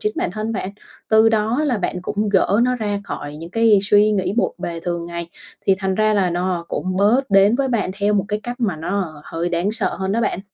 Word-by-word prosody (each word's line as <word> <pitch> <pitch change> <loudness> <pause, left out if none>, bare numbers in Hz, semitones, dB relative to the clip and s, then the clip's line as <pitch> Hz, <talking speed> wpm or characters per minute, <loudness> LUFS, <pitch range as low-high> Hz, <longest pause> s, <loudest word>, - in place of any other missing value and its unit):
chính 210 - -1
bản - - -1
thân 215 +3 -3
bạn, 195 -3 -3 0.4
từ 220 0 +5
đó 225 +5 +1
là 250 -6 0
bạn 180 -1 -3
cũng 210 +3 -2
gỡ 200 +2 +3
nó 250 0 +2
ra 205 -3 -2
khỏi 145 -6 -6
những 165 +2 -9
cái 225 0 +4
suy 205 +1 +4
nghĩ 190 -2 0
bộn - - +1
bề 170 -2 -4
thường 170 0 -3
ngày, 170 0 -6 0.4
thì 195 - +5
thành 190 -1 -1
ra 215 +1 +2
là 190 -3 +2
nó 175 0 -1
cũng 185 +5 -3
bớt 225 +6 +2
đến 195 +4 +5
với 275 -1 0
bạn 225 -6 0
theo 205 +1 +2
một 200 -2 +1
cái 210 0 -2
cách 245 +1 -6
mà 200 -8 0
nó 165 -2 -3
hơi 165 +1 -3
đáng 175 +3 0
sợ 225 -2 -1
hơn 190 0 -2
đó 230 - +1
bạn. 210 -4 -1
200 Hz, 245 wpm, -20 LUFS, 180-220 Hz, 0.4 s, từ